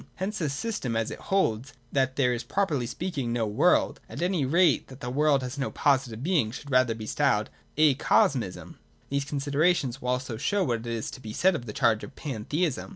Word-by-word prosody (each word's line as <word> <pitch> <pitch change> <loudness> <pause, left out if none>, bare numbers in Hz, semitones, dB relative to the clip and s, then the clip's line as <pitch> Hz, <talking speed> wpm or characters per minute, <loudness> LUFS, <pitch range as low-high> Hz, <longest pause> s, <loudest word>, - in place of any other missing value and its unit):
Hence 210 +3 -3
his 155 -5 -1
system, 140 - -3
as 115 -1 -1
it - - -7
holds 135 - +1 0.2
that 130 -1 +1
there 125 -3 +2
is 120 - -2
properly 145 -4 0
speaking 135 -2 -3
no 115 -1 0
world, 120 +12 +2
at - - -7
any 175 -6 +1
rate 165 +2 +3
that 130 0 -12
the 125 -1 -5
world 145 0 +2
has 130 +3 -5
no 135 - -1
positive 130 -5 +1
being, 160 -10 +2
should 140 +5 -8
rather 125 -3 +3
be 110 -1 -7
styled - - +1 0.3
Acosmism. 135 -7 +2 0.3
These 140 0 -1
considerations 145 -1 0
will 125 - -3
also 125 -2 -2
show 195 - +1
what 120 -4 -2
is 115 -2 -3
to 130 - -10
be 110 -2 -7
said 190 +9 +3
of 120 -8 -5
the - - -4
charge 110 0 +2
of 135 - -9
Pantheism. 145 +4 -2
135 Hz, 200 wpm, -27 LUFS, 120-155 Hz, 0.3 s, rate